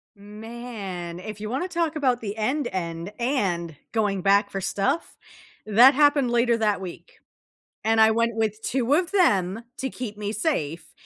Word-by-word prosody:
Man, 205 -4 -7
if 210 +2 -8
you 210 0 -5
wanna 265 +10 -2
talk 335 -3 -1
about 260 -5 +1
the 205 -2 -4
end 255 +6 -1
end 170 +1 -4
and 190 - -1 0.2
going 205 -4 0
back 200 +2 +3
for 195 - -4
stuff, 195 - -1 0.5
that 235 +6 +7
happened 285 -3 +3
later 240 0 +3
that 210 -3 +1
week, 190 - -10 0.7
and 225 0 +3
I 220 0 +7
went 230 +1 +1
with 220 -1 -1
2 260 +1 +1
of 355 +4 +1
them 210 - +2 0.2
to 265 - -2
keep 215 -5 -6
me 205 0 -3
safe 165 - -2
220 Hz, 165 wpm, -25 LUFS, 195-255 Hz, 0.7 s, that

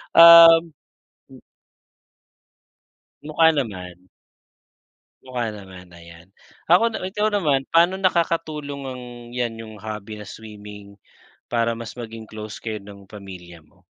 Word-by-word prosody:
Uhm 165 0 +9 0.6
mm. - - -15 1.8
Mukha 155 +2 +3
naman. 95 - -6 1.2
Mukha 120 -3 -3
naman, 95 -3 -13
ayan. 85 +1 -16 0.4
Ako 180 +6 +6
na 220 - -6
ikaw 210 +3 -1
naman, 150 -10 0
paano 175 +3 +3
nakakatulong 160 -6 -1
ang 125 -1 -7 0.3
'yan, 120 -2 -3
yung 110 -1 -10
hobby 105 0 -8
na 105 - -9
swimming, 105 -1 -12 0.5
para 115 -1 0
mas 115 -1 -8
maging 115 -2 -9
close 110 -1 -9
kayo 110 -3 -6
ng 100 -1 -14
pamilya 90 -5 -12
mo? 75 - -29
115 Hz, 115 wpm, -22 LUFS, 100-155 Hz, 1.8 s, Uhm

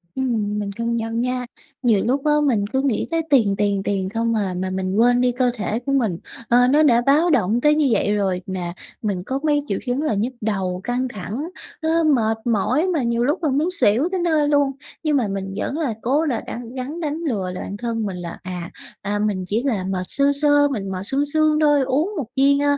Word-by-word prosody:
Ừm, 220 -6 -1
mình 200 -1 -3
công 230 +3 -2
nhận 225 +1 -2
nha! 250 0 -1 0.4
Nhiều 225 -5 +3
lúc 270 +4 0
á, 300 - +4
mình 225 -8 +1
cứ 265 +5 0
nghĩ 270 -6 0
tới 330 0 +1
tiền, 225 -8 +4
tiền, 200 -1 +1
tiền 195 -2 -1
không 230 0 0
à, 195 -4 -1
mà 185 +1 -2
mình 185 0 -2
quên 245 +3 +4
đi 250 - +3
cơ 250 0 +1
thể 215 +1 -2
của 255 +3 -4
mình. 230 -11 +1 0.3
Ờ, 245 +1 +5
nó 295 +4 +4
đã 240 -5 +4
báo 290 +7 +3
động 235 - +2
tới 300 0 +4
như 300 -2 +3
vậy 205 - +1
rồi 190 -3 0
mà 180 -2 -4 0.3
mình 195 -5 -2
có 265 +6 -3
mấy 295 -2 +2
triệu - - -1
chứng 250 +3 -1
là 305 -7 0
nhức 220 +6 -1
đầu, 190 -4 -2
căng 245 +2 -1
thẳng, 220 - -5 0.3
nó 325 +1 +2
mệt 225 -8 +2
mỏi 245 - +1
mà 325 -7 0
nhiều 235 0 0
lúc 300 +7 0
là 305 - +2
muốn 300 +7 +1
xỉu 275 - +3
tới 375 - -1
nơi 315 -4 +2
luôn, 285 -2 +3 0.3
nhưng 300 -2 +2
mà 240 -5 +1
mình 195 -1 -4
vẫn 285 - -2
là 280 -8 -1
cố 285 +7 +1
là 250 -7 -1
đắng 235 +1 -8
gắng 270 +6 -5
đánh 305 -2 -2
lừa 225 - -2
là 180 - -6
bạn 200 - -6
thân 230 0 -2
mình 190 -3 -4
là, 170 -1 -6
à, 180 -2 -6 0.3
à, 205 +1 -2
mình 205 -3 -1
chỉ 220 +5 -1
là 225 -9 0
mệt 185 -1 -2
sơ 280 0 +2
sơ, 290 -1 +5
mình 205 -9 -4
mệt 185 -1 -4
sương 275 +7 0
sương 310 +1 +2
thôi, 295 -2 +4
uống 290 +10 0
một 280 -7 -3
viên, 280 +1 +4
a, 285 0 +2
245 Hz, 235 wpm, -21 LUFS, 205-285 Hz, 0.4 s, Ờ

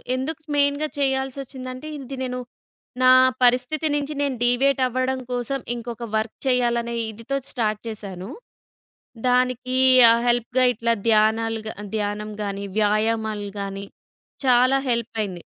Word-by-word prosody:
ఎందుకు 295 +5 -4
మెయిన్‌గా 285 +1 +2
చేయాల్సోచ్చిందంటే, 265 0 -3
ఇంది 270 -1 -7
నేను 250 -1 -3 0.6
నా 255 0 +7 0.3
పరిస్థితి 250 +6 +2
నుంచి 290 +1 -2
నేను 280 -2 0
డీవియేట్ 260 +3 +2
అవ్వడం 255 +1 -1
కోసం, 245 +2 -2 0.2
ఇంకొక 235 0 -6
వర్క్ 220 0 -3
చేయాలనే 235 -2 +1 0.2
ఇదితో 230 +6 -4
స్టార్ట్ 215 -4 -1
చేశాను. 200 -3 -6 1.0
దానికి 255 0 +1 0.3
ఆ - - +6
హెల్ప్‌గా 245 +1 +2
ఇట్లా 230 +1 0 0.2
ధ్యానాలు 220 +1 +2
గ - - -3 0.3
ధ్యానం 210 0 -3
గాని, 200 0 -4
వ్యాయామాలు 215 0 0
గానీ 195 0 -5 0.6
చాలా 255 +2 +5
హెల్ప్ 235 -1 -1
అయింది. 185 -4 -6
245 Hz, 120 wpm, -23 LUFS, 220-260 Hz, 1.0 s, నా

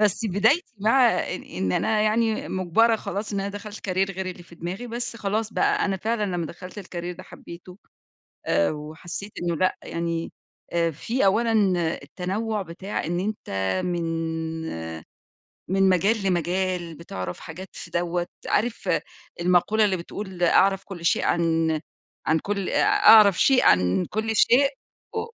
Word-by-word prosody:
بس 210 -3 +2
بدايتي 220 - +2
مع 235 +5 +5
إ 180 - -1
إن 95 - -3
أنا 220 - +1
يعني 220 +1 +1
مُجبرة 190 +5 +3
خلاص 210 0 -4
إن 200 - -1
أنا 195 - -2
دخلت 205 0 -8
Career 190 +1 +1
غير 190 0 -4
اللي 180 -1 -6
في 170 - -16
دماغي، 180 +8 -5
بس 240 0 -4
خلاص 215 +1 -2
بقى، - - +2
أنا 195 -1 0
فعلًا 220 +3 -1
لما 175 -4 -2
دخلت 180 +5 -9
الCareer 175 -2 -6
ده - - -9
حبِّيته، 180 +2 -12 0.7
آآ 85 0 +2
وحسيت 160 +6 -7
إنّه 170 -1 0
لأ، 185 +3 +1
يعني، 170 0 -3 0.4
آآ 170 -1 +1
في 225 - -1
أولًا 225 +4 +3 0.5
التنوع 200 +8 -3
بتاع 185 +3 -5
إن 175 +2 -1
أنتَ 210 +3 -4 0.4
من 175 -1 -1 1.6
من 195 +1 +3
مجال 200 +4 +2
لمجال، 180 -1 -1
بتعرف 95 - -6
حاجات 180 +4 -9
في 170 - -9
دَوَّة، 175 +1 -1 0.2
عارف 235 +1 0 0.5
المقولة 180 +5 +3
اللي 190 -2 +1
بتقول: 185 +1 -6
"أعرف 195 +3 +4
كل 175 -4 -8
شيء - - +2
عن- 165 -2 +1 0.5
عن 160 +1 +3
كل 200 +2 -2
آآ - - +2
أعرف 225 - +7
شيء 265 -2 +5
عن 90 +1 +4
كل 220 +1 -1
شيء 265 +6 +5 0.5
و 445 0 -1
190 Hz, 150 wpm, -25 LUFS, 170-215 Hz, 1.6 s, أعرف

